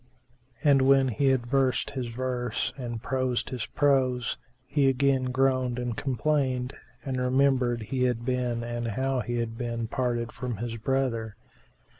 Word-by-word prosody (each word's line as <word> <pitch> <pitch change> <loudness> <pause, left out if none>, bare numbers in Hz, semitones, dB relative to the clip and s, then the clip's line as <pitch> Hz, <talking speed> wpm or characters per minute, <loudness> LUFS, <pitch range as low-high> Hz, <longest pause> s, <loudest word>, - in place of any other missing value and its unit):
And 140 -2 +5
when 135 0 +5
he 130 +5 +1
had 130 -3 +2
versed 130 0 +1
his 130 -3 -3
verse 125 -1 -2
and 125 -3 -5
had 115 - -6
prosed 130 -2 -1
his 125 -4 -3
prose, 130 -4 +1 0.3
he 135 +1 +2
again 135 0 +2
groaned 130 -1 +1
and 120 -2 -2
complained 130 -1 0 0.3
and 130 -2 -2
remembered 125 -2 +2
he 125 +3 0
had 120 -2 -1
been 125 -2 -1
and 120 0 -3
how 130 +4 0
he 120 0 -2
had 115 -1 -3
been 115 -2 -2
parted 120 -1 -1
from 125 -4 -4
his 115 +1 -4
brother. 115 -3 -1
125 Hz, 155 wpm, -27 LUFS, 120-135 Hz, 0.3 s, And